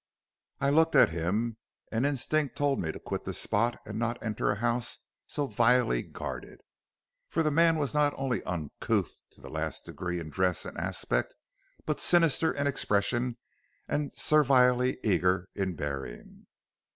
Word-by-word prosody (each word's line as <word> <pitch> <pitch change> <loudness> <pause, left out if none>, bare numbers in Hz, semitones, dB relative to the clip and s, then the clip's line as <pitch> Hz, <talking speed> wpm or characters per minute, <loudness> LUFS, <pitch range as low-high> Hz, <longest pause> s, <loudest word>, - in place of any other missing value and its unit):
"I 140 0 +2
looked 160 +2 +4
at - - +7
him, 105 +8 -1 0.3
and 115 +5 +1
instinct 145 +1 0
told 145 -1 +1
me 80 - -2
to - - -9
quit - - -4
the - - -4
spot 115 +3 0
and 105 0 -5
not 120 0 -1
enter 110 -3 -1
a 105 - +2
house 120 +2 -1 0.3
so 145 - -2
vilely 120 - +3
guarded. - - -7 0.7
For 165 - 0
the 155 - +1
man 165 +1 +4
was 145 -2 -1
not 150 -1 +2
only 130 -6 -1
uncouth 85 -5 -2
to - - -21
the - - -10
last - - -3
degree 90 -1 -4
in 80 -2 -7
dress 90 +3 0
and - - -7
aspect, - - -2 0.5
but - - -1
sinister 165 -2 +3
in 140 - -2
expression 120 -2 0 0.5
and 145 -2 -1
servilely 130 -4 +4
eager 90 -2 +2
in 95 -3 -2
bearing. 70 -5 -6
120 Hz, 155 wpm, -29 LUFS, 95-145 Hz, 0.7 s, at